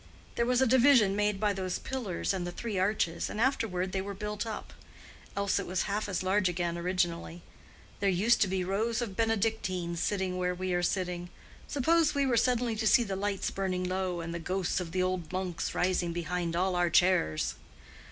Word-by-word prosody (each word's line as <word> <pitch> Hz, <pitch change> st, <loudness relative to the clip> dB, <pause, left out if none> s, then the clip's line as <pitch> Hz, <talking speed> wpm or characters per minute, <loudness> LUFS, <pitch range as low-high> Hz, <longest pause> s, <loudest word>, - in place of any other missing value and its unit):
There 235 Hz, -, 0 dB
was 250 Hz, +1 st, +3 dB
a -, -, +4 dB
division 245 Hz, -5 st, +5 dB
made 210 Hz, -1 st, +1 dB
by 210 Hz, -1 st, +2 dB
those 185 Hz, -2 st, -2 dB
pillars 220 Hz, -10 st, -3 dB
and 180 Hz, -2 st, -3 dB
the -, -, -4 dB
three 210 Hz, +1 st, -3 dB
arches, 185 Hz, -4 st, 0 dB
and -, -, -5 dB
afterward 210 Hz, -8 st, 0 dB
they 190 Hz, -, -1 dB
were 200 Hz, +1 st, -5 dB
built 210 Hz, +2 st, -4 dB
up. 215 Hz, -2 st, -6 dB, 0.6 s
Else 200 Hz, 0 st, +1 dB
it -, -, -4 dB
was 185 Hz, +1 st, 0 dB
half 205 Hz, +1 st, -2 dB
as 185 Hz, -, -1 dB
large 190 Hz, 0 st, +2 dB
again 175 Hz, -1 st, -2 dB
originally. 170 Hz, -1 st, -2 dB, 0.6 s
There 200 Hz, -, +2 dB
used 205 Hz, +6 st, +3 dB
to 205 Hz, -, +5 dB
be 190 Hz, 0 st, -1 dB
rows 220 Hz, +6 st, 0 dB
of 200 Hz, -5 st, -6 dB
Benedictines 200 Hz, -6 st, 0 dB
sitting 190 Hz, -2 st, -1 dB
where 180 Hz, 0 st, 0 dB
we 185 Hz, 0 st, -2 dB
are 175 Hz, -, +1 dB
sitting. 180 Hz, -1 st, -2 dB, 0.4 s
Suppose 305 Hz, +3 st, +2 dB
we 280 Hz, -1 st, +2 dB
were 255 Hz, -3 st, +2 dB
suddenly 240 Hz, -1 st, +2 dB
to 220 Hz, 0 st, 0 dB
see 240 Hz, -, +6 dB
the 195 Hz, -3 st, -3 dB
lights 200 Hz, 0 st, -1 dB
burning 185 Hz, -2 st, -2 dB
low 185 Hz, -1 st, -2 dB
and 165 Hz, 0 st, -5 dB
the 170 Hz, -, -3 dB
ghosts 185 Hz, +2 st, -1 dB
of 175 Hz, -2 st, -5 dB
the 185 Hz, +1 st, +1 dB
old 185 Hz, -3 st, -2 dB
monks 185 Hz, -2 st, -3 dB
rising 180 Hz, -1 st, +1 dB
behind 175 Hz, 0 st, -2 dB
all 185 Hz, +1 st, +1 dB
our 175 Hz, -1 st, +2 dB
chairs!" 80 Hz, -, +2 dB
190 Hz, 200 wpm, -30 LUFS, 180-215 Hz, 0.6 s, see